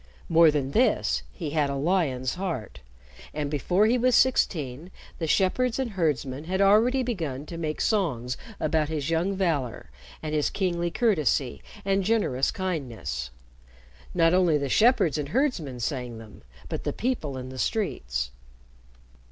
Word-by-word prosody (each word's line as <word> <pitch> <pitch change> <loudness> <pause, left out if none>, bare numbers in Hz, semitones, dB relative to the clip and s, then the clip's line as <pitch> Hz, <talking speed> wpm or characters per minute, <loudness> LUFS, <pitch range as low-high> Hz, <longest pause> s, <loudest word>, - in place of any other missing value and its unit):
More 165 -1 +6
than 140 -3 -1
this, - - +2
he 65 - -5
had 150 -2 +1
a 140 - -2
lion's 140 -5 0
heart, 175 - -4 0.6
and 145 -1 -2
before 180 +7 +2
he 240 +3 +3
was 250 0 +3
sixteen, 160 - +1 0.3
the 165 - -2
shepherds 225 +9 +2
and 260 -4 -2
herdsmen 150 -6 -1
had 190 +3 -2
already 220 +7 +4
begun 160 - -3
to 170 - -8
make 155 -2 -3
songs 130 - 0 0.2
about 155 -1 +1
his 155 -1 -2
young 175 +4 +1
valor, 145 - -1 0.3
and 155 -1 -3
his 150 -1 +1
kingly 175 -3 -1
courtesy, 155 - +1 0.2
and 195 0 +2
generous 185 - +1
kindness. 115 - -3 0.9
Not 165 -1 +4
only 180 -4 +4
the 140 -1 -2
shepherds 215 - +4
and 145 -1 -3
herdsmen 170 - -1
sang 125 -2 -3
them, 110 -2 -12 0.3
but - - -4
the - - -2
people 200 - -2
in 130 0 -6
the 130 0 -8
streets. 60 - -1
160 Hz, 150 wpm, -26 LUFS, 130-190 Hz, 0.9 s, More